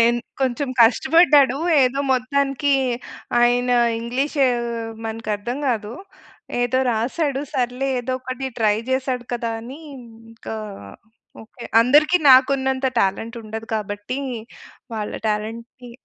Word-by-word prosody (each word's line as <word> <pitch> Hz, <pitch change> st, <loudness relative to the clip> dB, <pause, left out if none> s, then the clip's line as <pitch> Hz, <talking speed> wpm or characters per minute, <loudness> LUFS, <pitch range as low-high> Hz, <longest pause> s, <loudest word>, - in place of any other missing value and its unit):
ఎన్ 240 Hz, 0 st, +2 dB, 0.2 s
కొంచెం 265 Hz, +1 st, 0 dB
కష్టపడ్డాడు. 275 Hz, +3 st, +5 dB, 0.3 s
ఏదో 260 Hz, +2 st, +1 dB
మొత్తానికి 275 Hz, +2 st, 0 dB, 0.7 s
ఆయన 245 Hz, +1 st, +3 dB, 0.3 s
ఇంగ్లీషు 270 Hz, +5 st, 0 dB, 0.6 s
మనకు 225 Hz, 0 st, -5 dB
అర్థం 235 Hz, +6 st, -4 dB
గాదు. 225 Hz, -4 st, -1 dB, 0.7 s
ఏదో 245 Hz, +1 st, +1 dB
రాసాడు. 265 Hz, +5 st, -1 dB
సర్లే, 250 Hz, +2 st, -1 dB
ఏదో 250 Hz, +1 st, -4 dB
ఒకటి 255 Hz, +1 st, -5 dB
ట్రై 215 Hz, -2 st, +3 dB
జేసాడు 260 Hz, -1 st, -1 dB
కదా! 235 Hz, -1 st, -2 dB
అని 255 Hz, +5 st, -9 dB, 0.5 s
ఇంకా, 225 Hz, 0 st, -8 dB, 0.9 s
ఓకే. 235 Hz, +2 st, -13 dB, 0.2 s
అందరికి 295 Hz, +8 st, +5 dB
నాకున్నంత 265 Hz, 0 st, +4 dB
టాలెంట్ 225 Hz, +5 st, -1 dB
ఉండదు 220 Hz, +1 st, -7 dB
కాబట్టి, 205 Hz, +4 st, -5 dB, 0.8 s
వాళ్ళ 210 Hz, -1 st, -4 dB, 0.2 s
టాలెంట్‌ని 230 Hz, +3 st, -5 dB
245 Hz, 105 wpm, -21 LUFS, 225-265 Hz, 0.9 s, కష్టపడ్డాడు